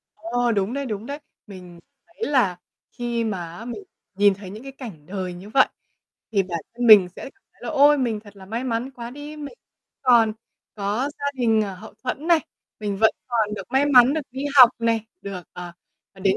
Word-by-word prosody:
Ồ, 235 Hz, +2 st, -1 dB
đúng 200 Hz, +2 st, 0 dB
đấy, 280 Hz, 0 st, -3 dB
đúng 215 Hz, -2 st, -4 dB
đấy. 285 Hz, +3 st, -5 dB, 0.3 s
Mình 180 Hz, -4 st, -11 dB, 0.3 s
thấy 345 Hz, +6 st, -9 dB
là 195 Hz, -10 st, +2 dB, 0.3 s
khi 240 Hz, -1 st, -2 dB
mà 175 Hz, -6 st, -4 dB
á 225 Hz, -, -9 dB
mình 245 Hz, +12 st, -6 dB, 0.3 s
nhìn 205 Hz, 0 st, +5 dB
thấy 195 Hz, -1 st, -10 dB
những 215 Hz, +5 st, -9 dB
cái 270 Hz, -, -8 dB
cảnh 220 Hz, -, -10 dB
đời 185 Hz, 0 st, -4 dB
như 185 Hz, +4 st, -10 dB
vậy 270 Hz, -, +5 dB, 0.7 s
thì 200 Hz, -2 st, +3 dB
bản 170 Hz, -3 st, -4 dB
thân 245 Hz, 0 st, -1 dB
mình 205 Hz, -5 st, +9 dB
sẽ -, -, -8 dB
cảm 390 Hz, +9 st, -13 dB
thấy -, -, -30 dB
là -, -, -5 dB
ôi 290 Hz, -1 st, +5 dB
mình 230 Hz, -5 st, -1 dB
thật 205 Hz, -2 st, -16 dB
là 190 Hz, -1 st, -12 dB
may 230 Hz, +5 st, -3 dB
mắn 245 Hz, +1 st, -2 dB
quá 240 Hz, -2 st, -8 dB
đi, 290 Hz, +3 st, -9 dB
mình 295 Hz, +7 st, -8 dB, 0.5 s
còn 235 Hz, -4 st, +5 dB, 0.4 s
có 210 Hz, +6 st, -1 dB
gia 285 Hz, -, -3 dB
đình, 225 Hz, -4 st, +2 dB
ờ, 195 Hz, -2 st, -4 dB
hậu 185 Hz, -, -12 dB
thuẫn 280 Hz, +5 st, -3 dB
này, 340 Hz, -2 st, +5 dB, 0.4 s
mình 205 Hz, -2 st, -2 dB
vẫn 220 Hz, -, +6 dB, 0.2 s
còn 220 Hz, -4 st, 0 dB
được 210 Hz, -, -8 dB
may 270 Hz, +2 st, +3 dB
mắn 260 Hz, -1 st, +6 dB
được 315 Hz, -, 0 dB
đi 265 Hz, +3 st, -5 dB
học 250 Hz, -3 st, +11 dB
này, 230 Hz, -1 st, 0 dB, 0.2 s
được, 195 Hz, -3 st, -6 dB
ờ, 175 Hz, -1 st, -8 dB, 0.4 s
đến 195 Hz, 0 st, +1 dB
225 Hz, 215 wpm, -23 LUFS, 200-260 Hz, 0.7 s, học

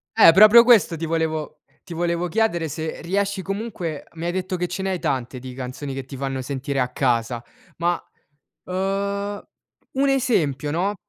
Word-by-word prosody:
Eh, 210 Hz, -7 st, +9 dB
proprio 215 Hz, +5 st, +8 dB
questo 230 Hz, -8 st, +5 dB
ti 165 Hz, +1 st, -4 dB
volevo 155 Hz, -2 st, -2 dB, 0.2 s
ti 175 Hz, -, -9 dB
volevo 170 Hz, +1 st, 0 dB
chiedere 175 Hz, -4 st, 0 dB
se 160 Hz, +3 st, -5 dB
riesci 195 Hz, +3 st, -1 dB
comunque 195 Hz, -5 st, -4 dB
mi 165 Hz, 0 st, -6 dB
hai 175 Hz, -, 0 dB
detto 185 Hz, 0 st, -2 dB
che 180 Hz, 0 st, -1 dB
ce 180 Hz, +2 st, -4 dB
ne 190 Hz, -, -1 dB
hai 185 Hz, -, -2 dB
tante, 130 Hz, -3 st, -2 dB
di 130 Hz, 0 st, -8 dB
canzoni 130 Hz, +2 st, -6 dB
che 135 Hz, -1 st, -5 dB
ti 135 Hz, +1 st, -9 dB
fanno 135 Hz, 0 st, -3 dB
sentire 140 Hz, +1 st, -3 dB
a 125 Hz, -, +2 dB
casa 120 Hz, -2 st, 0 dB, 0.3 s
ma, 175 Hz, +1 st, +1 dB, 0.7 s
uhm, 200 Hz, +2 st, -2 dB, 0.5 s
un 275 Hz, +1 st, +2 dB
esempio 175 Hz, -, +1 dB
no? 185 Hz, +7 st, 0 dB
170 Hz, 175 wpm, -23 LUFS, 140-195 Hz, 0.7 s, Eh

